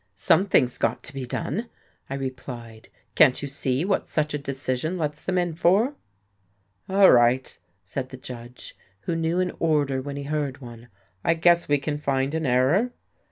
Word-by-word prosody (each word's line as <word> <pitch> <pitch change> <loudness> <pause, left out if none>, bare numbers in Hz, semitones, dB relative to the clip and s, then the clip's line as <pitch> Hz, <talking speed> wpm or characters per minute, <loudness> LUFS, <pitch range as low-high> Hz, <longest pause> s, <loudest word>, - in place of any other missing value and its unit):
"Something's 145 -10 +3
got 115 - 0
to 145 - -9
be 135 -2 -5
done," 195 - -3 0.4
I 135 - -3
replied. 125 -4 -7 0.2
"Can't 135 -5 +5
you 140 - -4
see 140 +1 -1
what 195 0 0
such 150 -1 -1
a 150 - -1
decision 140 +4 -2
lets 150 -2 -3
them 185 -1 -1
in 175 -2 0
for?" 190 - +3 1.0
"All 195 0 +6
right," 120 +2 +3 0.3
said 130 -1 -5
the 130 - -9
judge, 125 -1 -10 0.3
who 170 - -2
knew 165 +2 0
an 185 -1 0
order 145 -5 +1
when 140 +1 -6
he 140 - -4
heard 145 -2 -2
one, 120 -2 -11 0.4
"I 165 - +3
guess 175 +1 +4
we 145 - +3
can 145 +1 -3
find 135 -1 0
an 160 -2 -1
error." 140 - +2
145 Hz, 170 wpm, -25 LUFS, 130-165 Hz, 1.0 s, All